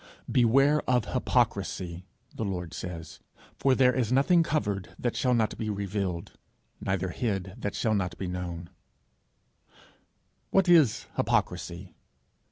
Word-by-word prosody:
'Beware 135 +5 +4
of 125 -4 +3
hypocrisy,' 90 0 0 0.3
the - - -4
Lord 90 -5 -4
says, 85 -4 -7 0.4
'for 135 -1 +3
there 125 -1 +4
is 125 -3 0
nothing 140 +7 +4
covered, 110 - -2
that 120 - -2
shall 125 -1 +2
not 110 -2 +1
be 110 - -2
revealed, 100 -3 -3 0.4
neither 95 -1 -1
hid, 95 -4 -2
that 105 -3 -3
shall 110 -3 +1
not 90 -4 -1
be 95 - -4
known,' 90 -1 -5 1.8
What 195 -1 +3
is 160 -10 +5
hypocrisy? - - -1
105 Hz, 125 wpm, -28 LUFS, 90-125 Hz, 1.8 s, is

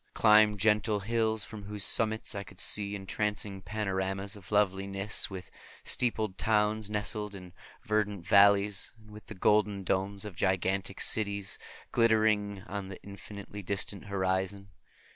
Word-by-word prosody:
I - - -9
climbed 105 -1 +5
gentle 105 0 +2
hills 110 -1 0
from 105 -3 -9
whose 105 0 0
summits 110 0 +2
I 100 - -4
could 100 -2 -14
see 105 -1 +3
entrancing 100 0 -3
panoramas 95 +1 -3
of 100 -1 -14
loveliness, 100 0 0
with 95 -2 -9 0.3
steepled 110 -5 -1
towns 105 -1 +1
nestling 105 -1 -2
in 90 -2 -11 0.3
verdant 105 -4 -1
valleys, 100 0 +4
and 110 -1 -18
with 105 0 -12
the 105 - -8
golden 105 0 +2
domes 95 +2 -1
of 105 -4 -8
gigantic 95 +1 -1
cities 100 -2 0 0.3
glittering 110 -4 +2
on 100 -1 -6
the 95 -1 -9
infinitely 100 +1 -9
distant 100 +1 -1
horizon. 95 0 -2
100 Hz, 140 wpm, -30 LUFS, 95-105 Hz, 0.3 s, climbed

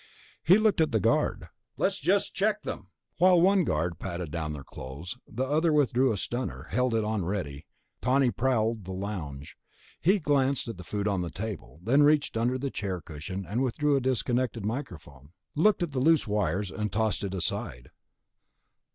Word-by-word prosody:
He 180 +5 +7
looked 215 -5 +3
at 160 - +2
the 110 - +2
guard. - - +1 0.3
"Let's - - +1
just - - +1
check - - 0
them." - - -6 0.3
While 180 0 +6
one 190 +2 +4
guard 80 - -1
patted 85 -4 -5
down 80 -2 -3
their 75 -2 -6
clothes, 70 - -8
the 130 +4 -2
other 155 +4 +2
withdrew 135 -3 +3
a 105 - -1
stunner, 120 +6 -3
held 125 -2 +1
it 110 - +1
on 105 -2 -1
ready. 80 -6 -4 0.3
Tawney 130 +1 +3
prowled 115 -5 0
the 95 - -5
lounge. 85 -8 -6 0.4
He 190 +5 +4
glanced 140 -6 +1
at 115 - -5
the 90 - -9
food 105 +1 -3
on 100 -3 0
the 85 - -3
table, 95 -5 -6
then 130 +8 +4
reached 145 -2 +3
under 120 +3 +1
the 135 +1 -3
chair 95 -3 -3
cushion 85 +5 -6
and 115 +5 -1
withdrew 145 +3 +1
the 135 - +2
disconnected 125 -2 0
microphone, 80 - -6 0.2
looked 190 +4 +3
at 170 - -3
the 135 - -2
loose 160 +3 +4
wires, 100 -2 -1
and 105 -2 -3
tossed 110 0 0
it 95 -1 -3
aside. 65 -8 -3
110 Hz, 180 wpm, -28 LUFS, 90-135 Hz, 0.4 s, He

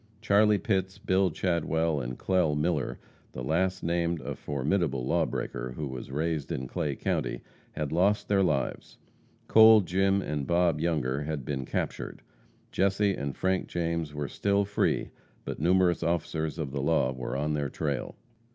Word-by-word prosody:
Charlie 105 -1 +4
Pitts, 95 -2 -1
Bill 95 -2 +2
Chadwell 80 -3 0
and 60 +1 -5
Clell 90 -6 +1
Miller 75 -3 -1 0.4
the 60 - -5
last 95 +7 0
named 85 0 0
a - - -4
formidable 70 -2 -1
lawbreaker, 65 -6 -1
who 75 - -3
was 65 -2 -6
raised 75 +1 -2
in 65 - -3
Clay 70 +2 -2
county - - -2 0.3
had 75 -2 -3
lost 95 +6 +2
their 100 -1 +3
lives. 70 -8 -1 0.5
Cole, 110 -1 +8
Jim 95 +2 +2
and 75 -6 -3
Bob 85 -3 +2
Younger 75 -5 0
had 75 -4 -4
been 65 -3 -3
captured. - - -4 0.5
Jesse 100 +1 +2
and 70 -3 -4
Frank 95 0 0
James 85 -2 -2
were 75 -1 -4
still 100 +4 +1
free, 105 +1 0 0.3
but - - -5
numerous 90 +2 +3
officers 80 -1 -1
of 75 -5 -3
the 70 0 -2
law 70 -3 +2
were 65 +1 -4
on 75 +2 -1
their 70 -2 -1
trail. 70 -4 -3
80 Hz, 155 wpm, -28 LUFS, 70-95 Hz, 0.5 s, Cole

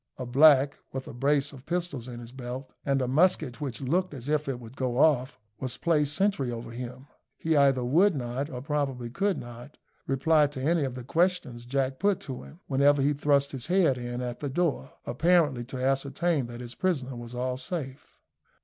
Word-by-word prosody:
A 125 - -4
black, 140 +2 +6 0.2
with 130 0 -5
a - - -8
brace 140 +3 +1
of 135 -1 -13
pistols 170 -8 -2
in 120 -1 -7
his 120 0 -10
belt, 130 +1 -7
and 135 -2 +1
a - - -1
musket 150 -2 +2
which 135 -4 -4
looked 170 +5 0
as 130 +1 -6
if 150 -1 0
it 130 -3 -3
would 120 +1 -12
go 125 -3 -2
off, 135 -3 +3 0.2
was 130 -2 -4
placed 150 -3 +1
sentry 190 -11 +1
over 115 0 -6
him. 125 +2 -7 0.3
He 160 0 0
either 135 -3 +4
would 175 +9 +4
not, 130 +2 -3
or 125 -2 -6
probably 135 -5 -2
could 195 +4 0
not, 120 +4 -10 0.3
reply 150 +3 +3
to 145 -2 -8
any 160 0 +2
of 130 -2 -4
the 125 - -6
questions 160 -5 0
Jack 135 0 -1
put 200 0 +2
to 130 -3 -6
him, 165 - -14
whenever 140 +1 +3
he 140 +2 +3
thrust 140 0 +2
his 130 -1 -5
head 175 -8 +3
in 120 0 -4
at 120 -1 -4
the 145 - -3
door, 150 -2 -1
apparently 150 -1 +2
to 130 +1 -7
ascertain 135 +3 0
that 120 0 -8
his 120 0 -7
prisoner 135 -6 -1
was 120 0 -8
all 125 +1 -2
safe. 135 -1 -6
135 Hz, 200 wpm, -28 LUFS, 125-150 Hz, 0.3 s, black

